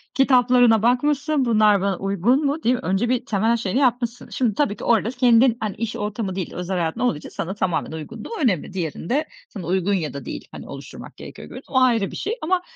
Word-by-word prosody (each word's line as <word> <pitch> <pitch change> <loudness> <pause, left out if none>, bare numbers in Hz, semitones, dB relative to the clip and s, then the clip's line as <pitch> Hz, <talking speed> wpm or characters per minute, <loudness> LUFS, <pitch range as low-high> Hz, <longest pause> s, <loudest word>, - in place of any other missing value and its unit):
Kitaplarına 250 -4 +4
bakmışsın. 285 +4 +1
"Bunlar 215 -4 +4
bana 195 -1 0
uygun 200 - +1
mu?" 290 +3 -1
diye. 245 +2 +3
Önce 235 -1 -1
bir 250 -1 0
temel 225 +3 +1
şeyini 225 +2 -1
yapmışsın. 245 -2 0
Şimdi 240 -5 0
tabii 280 -6 +1
ki - - -10
orada 225 -1 +2
kendin, 245 -1 +4
hani, 215 -3 -3
iş 230 0 -4
ortamı 210 -2 -3
değil, 185 -2 -4
özel 180 +1 -3
hayatın 165 -2 -2
olduğu 245 -11 +1
için - - -10
sana 185 - -4
tamamen 190 -6 -1
uygunluğu 210 +8 -8
önemli. 190 - 0
Diğerinde 190 - -2 0.2
sana 195 -6 -8
uygun 190 +3 0
ya 160 -8 -2
da 140 -2 -7
değil, - - -7
hani, - - -10
oluşturmak - - -10
gerekiyor 75 - -10
görün - - -9
O 260 - +2
ayrı 230 -6 +2
bir - - -8
şey 430 +3 -2
ama 360 +3 +1
225 Hz, 205 wpm, -22 LUFS, 190-250 Hz, 0.2 s, Kitaplarına